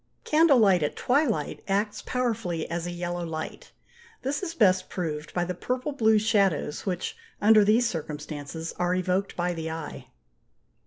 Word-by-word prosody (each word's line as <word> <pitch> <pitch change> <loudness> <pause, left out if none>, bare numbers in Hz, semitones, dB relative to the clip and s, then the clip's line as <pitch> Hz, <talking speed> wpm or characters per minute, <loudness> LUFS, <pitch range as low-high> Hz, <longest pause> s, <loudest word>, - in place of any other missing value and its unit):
Candle 310 -3 +5
light 195 -6 +5
at 150 - -1
twilight 250 - 0
acts 205 +2 0
powerfully 225 -10 -1
as 170 0 -2
a - - -3
yellow 175 0 -3
light: 160 -1 -6 0.5
this 275 +2 -1
is 335 -3 -4
best 185 - +3
proved 155 -4 -4
by 175 -1 0
the 180 - -3
purple 250 - -3
blue 220 -6 +3
shadows 200 -7 +1
which, 180 -1 -2 0.2
under 215 +1 +6
these 225 +4 +4
circumstances, 150 -1 -5
are 180 0 +1
evoked 185 +2 -1
by 175 0 0
the 160 -1 -4
eye. 160 -2 -6
185 Hz, 155 wpm, -27 LUFS, 165-220 Hz, 0.5 s, under